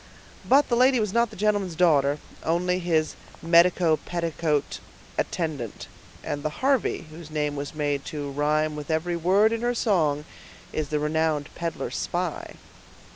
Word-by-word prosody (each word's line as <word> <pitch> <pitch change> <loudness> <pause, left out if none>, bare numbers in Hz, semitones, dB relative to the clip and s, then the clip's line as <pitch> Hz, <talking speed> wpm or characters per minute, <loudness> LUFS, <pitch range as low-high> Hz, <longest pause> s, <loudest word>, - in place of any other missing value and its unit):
"But 280 +3 +4
the 240 - +1
lady 255 +1 +4
was 210 -3 -1
not 235 0 +3
the - - -12
gentleman's 205 -3 0
daughter, 145 -4 +3 0.3
only 180 +2 +1
his 160 -3 +1 0.3
medico 170 -1 +4
petticoat 165 -4 -2 0.4
attendant; 150 - -3 0.4
and 145 - -3
the 155 - -5
Harvey, 270 -10 +1
whose 160 0 -10
name 150 -1 -1
was 145 +2 -5
made 145 -2 -1
to 145 -2 -5
rime 150 +2 +1
with 150 0 -7
every 165 +2 0
word 195 +6 +3
in 230 - -2
her 245 0 0
song, 155 -11 +1 0.5
is 155 -2 -2
the 150 - 0
renowned 150 -1 0
peddler 170 -1 -4
spy." - - -3
160 Hz, 150 wpm, -25 LUFS, 150-185 Hz, 0.5 s, But